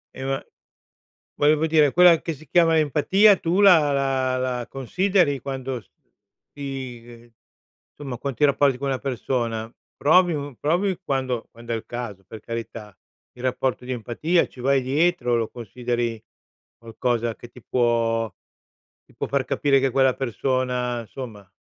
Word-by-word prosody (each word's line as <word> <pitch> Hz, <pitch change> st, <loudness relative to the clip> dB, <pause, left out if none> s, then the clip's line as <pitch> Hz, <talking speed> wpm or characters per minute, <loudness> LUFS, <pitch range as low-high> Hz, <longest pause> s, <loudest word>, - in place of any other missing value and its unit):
E 130 Hz, -, -7 dB
ma, 135 Hz, 0 st, -2 dB, 0.9 s
volevo 150 Hz, +2 st, +3 dB
dire 155 Hz, -3 st, +4 dB
quella 175 Hz, -2 st, +6 dB
che 165 Hz, -, -4 dB
si 155 Hz, +2 st, -16 dB
chiama 165 Hz, +1 st, +4 dB
empatia 190 Hz, +8 st, +4 dB
tu 175 Hz, +4 st, 0 dB
la 165 Hz, -8 st, +6 dB
la 135 Hz, -2 st, 0 dB
la 125 Hz, -2 st, -2 dB
consideri 145 Hz, -, +1 dB
quando 130 Hz, -2 st, -4 dB
s -, -, -28 dB, 0.6 s
ti 135 Hz, -4 st, -6 dB
ehm, 120 Hz, 0 st, -15 dB, 0.6 s
somma 135 Hz, -5 st, -6 dB
qua 140 Hz, +1 st, -3 dB
ti 150 Hz, -, 0 dB
rapporti 140 Hz, -2 st, +3 dB
con 140 Hz, -, -3 dB
una 135 Hz, -1 st, -1 dB
persona, 120 Hz, -4 st, -3 dB, 0.2 s
provi 175 Hz, +3 st, +4 dB
un 140 Hz, -4 st, -5 dB
provi 180 Hz, +5 st, 0 dB
quando 130 Hz, -5 st, -2 dB
quand'è 115 Hz, 0 st, -6 dB
il 110 Hz, -, -4 dB
caso 110 Hz, -6 st, -6 dB
per 110 Hz, -, -10 dB
carità, 115 Hz, -3 st, -7 dB, 0.4 s
il 125 Hz, -, -13 dB
rapporto 130 Hz, -1 st, -1 dB
di 130 Hz, -, -4 dB
empatia, 125 Hz, +9 st, 0 dB
ci 125 Hz, -, -14 dB
vai 135 Hz, +1 st, +2 dB
dietro, 135 Hz, -2 st, +1 dB
lo 115 Hz, -2 st, -1 dB
consideri 120 Hz, -1 st, -3 dB, 0.6 s
qualcosa 115 Hz, 0 st, -2 dB
che 120 Hz, -, -12 dB
ti 125 Hz, 0 st, -16 dB
può 115 Hz, -2 st, +1 dB, 0.8 s
ti -, -, -24 dB
può -, -, -3 dB
far 140 Hz, -2 st, 0 dB
capire 140 Hz, -2 st, +2 dB
che 135 Hz, 0 st, +1 dB
quella 130 Hz, 0 st, +3 dB
persona, 125 Hz, -1 st, -1 dB
insomma, 110 Hz, -5 st, -9 dB
130 Hz, 155 wpm, -23 LUFS, 120-145 Hz, 0.9 s, quella